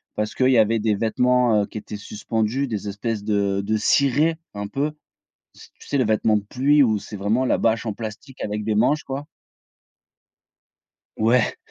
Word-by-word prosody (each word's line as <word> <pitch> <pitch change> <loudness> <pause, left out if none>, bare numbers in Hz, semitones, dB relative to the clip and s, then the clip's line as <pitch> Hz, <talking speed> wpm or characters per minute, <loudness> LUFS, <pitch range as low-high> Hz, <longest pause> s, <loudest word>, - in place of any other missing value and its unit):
Parce 105 0 -3
qu'il 130 0 +3
y 125 - +4
avait 110 +1 +3
des 105 -1 +1
vêtements, 120 0 +2
heu, - - -5
qui - - -8
étaient 105 - -8
suspendus, 110 +5 -2
des 105 -4 -4
espèces 105 +1 -3
de 100 -2 0
de 110 +2 0
cirés 140 +7 +2 0.2
un 100 0 -4
peu, 145 +8 -2 0.6
s - - -16
tu - - -15
sais 140 - 0
les 130 - +3
vêtements 110 0 +2
de 105 - -4
pluie 140 +6 +3
où 110 -4 +2
c'est 105 +1 -9
vraiment 110 +6 +1
la - - +2
bâche 115 +1 +1
en 110 - -1
plastique 115 +6 -8
avec 105 0 -3
des 110 -1 0
manches 125 +8 +2
quoi. 135 +2 -5 1.9
Ouais. 115 +2 +2
110 Hz, 185 wpm, -22 LUFS, 105-130 Hz, 1.9 s, y